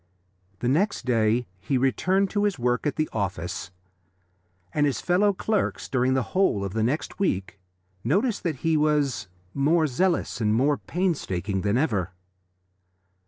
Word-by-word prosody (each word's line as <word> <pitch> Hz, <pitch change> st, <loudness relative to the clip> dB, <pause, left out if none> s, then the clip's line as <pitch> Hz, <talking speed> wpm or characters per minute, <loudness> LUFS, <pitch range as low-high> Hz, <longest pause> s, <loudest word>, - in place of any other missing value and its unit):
The 120 Hz, -, 0 dB
next 165 Hz, -, +1 dB
day 115 Hz, 0 st, +2 dB
he 130 Hz, +8 st, 0 dB
returned 185 Hz, +9 st, +1 dB
to 205 Hz, -1 st, +1 dB
his 205 Hz, -5 st, 0 dB
work 125 Hz, +3 st, 0 dB
at 145 Hz, -, -1 dB
the 155 Hz, -1 st, 0 dB
office, 95 Hz, -6 st, -3 dB, 1.0 s
and 145 Hz, -1 st, +3 dB
his 140 Hz, -, -1 dB
fellow 190 Hz, +4 st, +3 dB
clerks, 210 Hz, +2 st, -1 dB
during 130 Hz, 0 st, +1 dB
the 130 Hz, -, +1 dB
whole 185 Hz, -, +2 dB
of 95 Hz, -, -5 dB
the 110 Hz, -, 0 dB
next 130 Hz, -, -1 dB
week, 95 Hz, -, -1 dB, 0.4 s
noticed 200 Hz, -, +1 dB
that 160 Hz, -7 st, -3 dB
he 160 Hz, -1 st, +3 dB
was 150 Hz, -7 st, +1 dB, 0.3 s
more 155 Hz, +4 st, +3 dB
zealous 155 Hz, -2 st, 0 dB
and 105 Hz, 0 st, +2 dB
more 140 Hz, +4 st, +2 dB
painstaking 105 Hz, -, -1 dB
than 105 Hz, +4 st, +1 dB
ever. 100 Hz, -, 0 dB
135 Hz, 150 wpm, -25 LUFS, 110-175 Hz, 1.0 s, and